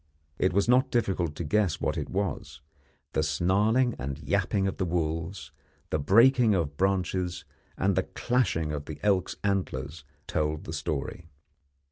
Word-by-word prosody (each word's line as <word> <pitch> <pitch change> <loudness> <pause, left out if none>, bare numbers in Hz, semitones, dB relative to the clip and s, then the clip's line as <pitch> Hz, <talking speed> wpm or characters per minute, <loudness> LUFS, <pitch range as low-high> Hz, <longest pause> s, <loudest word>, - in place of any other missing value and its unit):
It 95 - +3
was 100 +4 +2
not 125 +2 +4
difficult 95 -9 0
to - - -4
guess 90 +2 +1
what - - -1
it - - -4
was; 80 -7 -3 0.5
the - - +2
snarling 100 - +2
and 70 0 -4
yapping 100 +4 0
of 95 - -2
the 95 - 0
wolves, 80 -1 -2 0.4
the 75 - +1
breaking 115 - +5
of 75 -5 -1
branches, 95 -1 0 0.3
and 95 +1 +1
the - - +3 0.2
clashing 105 -11 +1
of 75 -1 -4
the 75 - -7
elk's 95 -3 +1
antlers, 80 -7 -2 0.2
told 75 0 -1
the 80 - -7
story. 75 +2 -4
90 Hz, 150 wpm, -28 LUFS, 75-100 Hz, 0.5 s, breaking